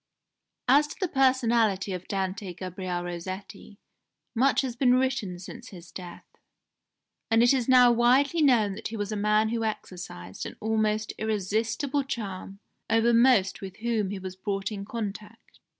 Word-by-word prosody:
"As 285 Hz, +4 st, +5 dB
to -, -, -9 dB
the 370 Hz, -, 0 dB
personality 235 Hz, -, +2 dB
of 180 Hz, 0 st, -6 dB
Dante 190 Hz, -1 st, -3 dB
Gabriel 185 Hz, 0 st, -4 dB
Rossetti 185 Hz, +4 st, -7 dB, 0.6 s
much 265 Hz, +5 st, +3 dB
has 255 Hz, -3 st, -4 dB
been 250 Hz, 0 st, +4 dB
written 255 Hz, -8 st, 0 dB
since 215 Hz, +7 st, -10 dB
his 175 Hz, -4 st, -12 dB
death, 180 Hz, -2 st, -9 dB, 1.0 s
and 225 Hz, +1 st, +4 dB
it 245 Hz, -, +5 dB
is 260 Hz, -2 st, 0 dB
now 250 Hz, -1 st, +7 dB
widely 260 Hz, +7 st, +3 dB
known 235 Hz, -8 st, +4 dB
that 210 Hz, -, -5 dB
he 225 Hz, -, -6 dB
was 205 Hz, 0 st, -3 dB
a -, -, -2 dB
man 210 Hz, +1 st, +2 dB
who 230 Hz, 0 st, -1 dB
exercised 180 Hz, -, -6 dB
an -, -, -9 dB
almost 215 Hz, 0 st, 0 dB
irresistible 220 Hz, +7 st, -1 dB
charm 195 Hz, -6 st, -6 dB, 0.3 s
over 225 Hz, +1 st, +3 dB
most 230 Hz, -5 st, +4 dB
with 190 Hz, 0 st, -8 dB
whom 225 Hz, -4 st, -1 dB
he 200 Hz, -, -4 dB
was 185 Hz, -1 st, -7 dB
brought 195 Hz, +1 st, -3 dB
in 200 Hz, -2 st, -5 dB
contact. 215 Hz, 0 st, -7 dB
215 Hz, 155 wpm, -27 LUFS, 195-240 Hz, 1.0 s, now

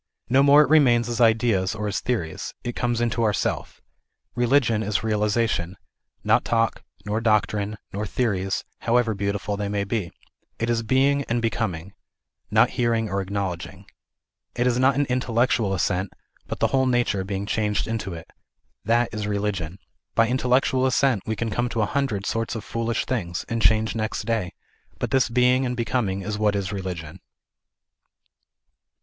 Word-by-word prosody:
No 130 Hz, +2 st, +5 dB
more 145 Hz, +2 st, +7 dB
it 140 Hz, -, -2 dB
remains 120 Hz, -7 st, +5 dB
as 120 Hz, 0 st, -2 dB
ideas 110 Hz, -4 st, +3 dB
or 105 Hz, -1 st, -3 dB
as 105 Hz, -, -1 dB
theories; 100 Hz, -11 st, -3 dB
it 120 Hz, -1 st, -4 dB
comes 120 Hz, -1 st, 0 dB
into 120 Hz, 0 st, 0 dB
our 110 Hz, -2 st, +2 dB
Self. -, -, -3 dB, 0.5 s
Religion 120 Hz, -2 st, +2 dB
is 105 Hz, 0 st, -1 dB
realization, 105 Hz, -4 st, 0 dB, 0.5 s
not -, -, +3 dB
talk, 115 Hz, -1 st, 0 dB, 0.2 s
nor 105 Hz, +2 st, -1 dB
[doctrine, 105 Hz, -1 st, +1 dB, 0.2 s
nor 105 Hz, +2 st, -3 dB
theories, 95 Hz, -5 st, -1 dB, 0.2 s
however 115 Hz, -1 st, +2 dB
beautiful 100 Hz, +1 st, -2 dB
they 100 Hz, -1 st, -2 dB
may 100 Hz, -1 st, -1 dB
be. 100 Hz, -3 st, -3 dB, 0.5 s
It 115 Hz, +1 st, -1 dB
is 115 Hz, -1 st, +1 dB
being 135 Hz, +5 st, +2 dB
and 120 Hz, +1 st, 0 dB
becoming, 100 Hz, -6 st, -2 dB, 0.6 s
not -, -, +4 dB
hearing 115 Hz, -2 st, 0 dB
or 100 Hz, 0 st, 0 dB
acknowledging; 95 Hz, -3 st, -4 dB, 0.7 s
it 120 Hz, -, 0 dB
is 125 Hz, -1 st, +2 dB
not 130 Hz, +1 st, +4 dB
an 145 Hz, +1 st, +2 dB
intellectual 120 Hz, -4 st, +1 dB
assent, 95 Hz, 0 st, 0 dB, 0.4 s
but -, -, -4 dB
the -, -, +2 dB
whole 130 Hz, -1 st, +3 dB
nature 120 Hz, -6 st, +1 dB
becoming 95 Hz, +1 st, -3 dB
changed 105 Hz, -1 st, 0 dB
into 110 Hz, -5 st, -3 dB
it. 80 Hz, -, -10 dB, 0.6 s
That 120 Hz, +2 st, +2 dB
is 105 Hz, -1 st, -3 dB
religion. 100 Hz, -5 st, -2 dB, 0.4 s
By 115 Hz, 0 st, +4 dB
intellectual 130 Hz, +1 st, +2 dB
assent 130 Hz, -4 st, +2 dB
we 110 Hz, -, -1 dB
can 115 Hz, +1 st, -3 dB
come 120 Hz, +3 st, 0 dB
to 115 Hz, -, -1 dB
a -, -, +3 dB
hundred 120 Hz, -7 st, -1 dB
sorts 115 Hz, +1 st, -2 dB
of 110 Hz, -, -5 dB
foolish 115 Hz, +1 st, -2 dB
things, 85 Hz, -9 st, -3 dB
and 115 Hz, -2 st, -2 dB
change 110 Hz, 0 st, +3 dB
next 110 Hz, -1 st, -2 dB
day, 105 Hz, -6 st, -1 dB, 0.4 s
but -, -, -3 dB
this 130 Hz, -2 st, +3 dB
being 125 Hz, +2 st, +3 dB
and 125 Hz, -1 st, -2 dB
becoming 115 Hz, -5 st, -1 dB
is 105 Hz, +1 st, -3 dB
what 105 Hz, -1 st, +2 dB
is 100 Hz, -1 st, -2 dB
religion. 90 Hz, -3 st, -5 dB
110 Hz, 165 wpm, -24 LUFS, 100-120 Hz, 0.7 s, more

